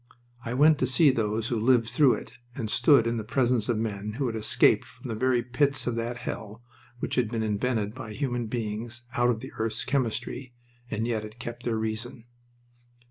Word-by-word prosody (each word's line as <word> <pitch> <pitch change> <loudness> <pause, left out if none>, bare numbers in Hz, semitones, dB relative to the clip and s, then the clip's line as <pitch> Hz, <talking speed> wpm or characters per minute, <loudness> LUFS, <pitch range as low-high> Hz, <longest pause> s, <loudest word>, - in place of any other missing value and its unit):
I 120 +1 -3
went 150 +2 +5
to - - +2
see 145 +2 +5
those 110 0 -1
who 120 -4 0
lived 115 0 +3
through 140 +1 +4
it 125 - -10 0.2
and 110 -5 -3
stood 140 -7 +5
in 115 0 0
the 110 - -3
presence 120 0 +1
of 120 - +2
men 105 -1 -3
who 135 +4 -2
had 115 -2 -2
escaped 110 -1 +3
from - - -11
the - - -2
very 125 +1 +2
pits 140 +3 +1
of 120 - -1
that 120 +1 -2
hell 110 0 -6 0.3
which - - -4
had 120 -4 +2
been 115 -1 -2
invented 110 0 -1
by 115 -4 -7
human 120 -3 -2
beings 115 +1 -4
out 120 -2 +2
of 115 -2 0
the 130 - -8
earth's 110 0 -1
chemistry, 125 -1 -2 0.3
and 110 +1 -2
yet 115 -3 0
had 110 +1 -10
kept 120 0 -7
their 115 -2 0
reason. 110 +2 -4
115 Hz, 200 wpm, -27 LUFS, 110-125 Hz, 0.3 s, went